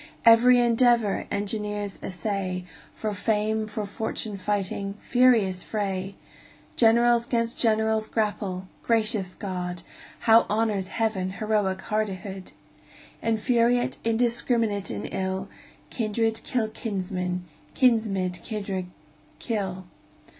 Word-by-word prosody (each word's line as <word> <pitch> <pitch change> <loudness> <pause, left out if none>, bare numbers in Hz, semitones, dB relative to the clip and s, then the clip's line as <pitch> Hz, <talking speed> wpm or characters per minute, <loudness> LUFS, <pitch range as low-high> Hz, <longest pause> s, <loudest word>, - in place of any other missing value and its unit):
Every 240 +2 +7
endeavor 235 -3 +3
engineers 205 -1 -3
essay, 185 0 -3 0.3
For 215 -1 -3
fame, 215 +1 0
for 215 0 -4
fortune 215 0 -3
fighting 200 0 -2
furious 230 -7 +3
fray! 195 -2 -3 0.6
Generals 235 +1 +4
'gainst 230 -1 -1
generals 220 -1 +2
grapple 200 -4 -2
gracious 215 -5 0
God! 180 -3 -4 0.4
How 225 0 +6
honors 210 -3 0
Heaven 195 -3 -1
heroic 205 -3 0
hardihood! 195 -3 -3 0.7
Infuriate, 235 +2 +2
indiscrminate 230 -2 +1
in 105 -2 -4
ill, 190 0 -3 0.4
Kindred 225 0 0
kill 225 -4 -1
kinsmen, 185 -4 -3 0.3
kinsmen 220 -8 +2
kindred 190 0 -4 0.5
kill. 190 -5 -3
210 Hz, 95 wpm, -26 LUFS, 190-225 Hz, 0.7 s, Every